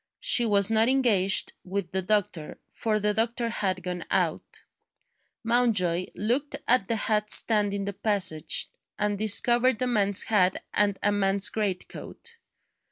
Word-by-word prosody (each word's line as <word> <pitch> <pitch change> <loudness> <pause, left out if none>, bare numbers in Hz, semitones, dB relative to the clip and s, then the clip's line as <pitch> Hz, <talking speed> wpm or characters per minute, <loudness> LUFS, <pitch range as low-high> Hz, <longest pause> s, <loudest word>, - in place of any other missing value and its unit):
She 255 - +3
was 200 0 +2
not 225 +2 +2
engaged 220 -8 +2
with 185 -1 -5
the 190 - -2
doctor, 185 -5 -2
for 215 -2 -2
the 210 0 0
doctor 230 +2 -2
had 190 -5 -2
gone 180 -1 -5
out. - - -2 0.8
Mountjoy 210 -7 +1
looked 250 +8 -2
at 240 -5 +2
the 230 - -1
hat 215 -1 -1
stand 210 -2 +3
in 200 0 -4
the 200 - -4
passage, 195 -7 -1 0.3
and 210 0 -1
discovered 240 +3 +2
a 255 - 0
man's 205 -5 +2
hat 190 -4 +1
and 205 -1 +1
a 205 - +2
man's 200 0 +1
greatcoat. 215 - -6
210 Hz, 145 wpm, -26 LUFS, 195-230 Hz, 0.8 s, She